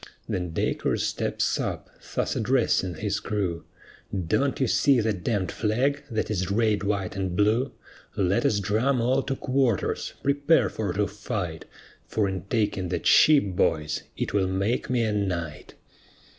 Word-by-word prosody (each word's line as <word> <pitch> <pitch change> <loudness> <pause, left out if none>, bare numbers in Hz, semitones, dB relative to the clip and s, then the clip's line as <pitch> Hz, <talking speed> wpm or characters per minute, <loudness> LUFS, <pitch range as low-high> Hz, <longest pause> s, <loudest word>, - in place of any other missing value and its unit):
Then 90 -1 -2
Dacres 80 - -1
steps - - -1
up, - - -3 0.3
thus - - 0
addressing 110 -7 +1
his 105 +4 -2
crew: 95 -6 -2 0.5
"Don't 110 +9 0
you 135 - +3
see 135 +2 +3
that 105 -5 -1
d 110 +2 +1
d 95 -3 -3
flag 130 +7 0
that 110 -2 -2
is 95 -3 -1
red, 105 0 +2
white, 100 -2 -1
and 95 -2 -2
blue; 110 +7 +2 0.5
Let 95 0 +2
us 105 - +2
drum 115 +6 +1
all 130 +3 +2
to 135 0 -3
quarters, 130 -6 0
prepare 145 +3 +3
for 105 -4 -3
to 105 +2 +1
fight, 100 -5 -4 0.4
For 105 -2 0
in 95 -1 -4
taking 100 -4 -1
that 90 - -3
ship 150 -2 +6
boys, 75 -3 +1 0.2
it - - -2
will 100 -2 +2
make 95 +6 -1
me 125 -2 +2
a 110 - 0
knight." 90 -7 -3
105 Hz, 155 wpm, -26 LUFS, 95-120 Hz, 0.5 s, ship